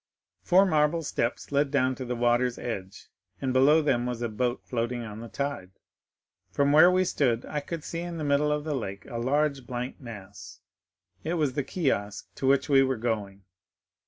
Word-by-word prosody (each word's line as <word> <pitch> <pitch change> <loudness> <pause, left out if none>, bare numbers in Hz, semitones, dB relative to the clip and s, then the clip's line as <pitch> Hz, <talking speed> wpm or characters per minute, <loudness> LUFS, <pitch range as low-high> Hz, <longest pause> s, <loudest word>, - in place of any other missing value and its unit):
Four 190 +2 +5
marble 155 -1 +2
steps 120 -3 -2
led 140 0 +2
down 130 -2 +2
to 130 0 -6
the 125 0 -3
water's 120 +1 +1
edge, 95 -5 -6 0.3
and 130 -1 -1
below 145 +5 +5
them 125 -4 +1
was 120 -1 -3
a 120 - -1
boat 120 +3 -2
floating 120 0 -2
on 110 -1 -8
the 115 - -7
tide. 140 -7 -4 0.8
40070m - - -24
"From 140 0 +3
where 155 +4 +8
we 185 0 +2
stood 125 -8 0
I 150 - -3
could 160 +2 -6
see 165 - -5
in 175 -1 -5
the 155 - -4
middle 145 +1 +2
of 150 0 -1
the 155 -1 -2
lake 100 -7 -5
a 120 - -5
large 140 +1 0
blank 125 +1 -5
mass; 100 -5 -10 0.6
it 165 +3 -1
was 150 -6 0
the 145 - -1
kiosk 105 - -2
to 135 - -3
which 140 0 +3
we 135 -2 +5
were 130 -2 +1
going. 105 -4 -3
130 Hz, 195 wpm, -27 LUFS, 120-150 Hz, 0.8 s, where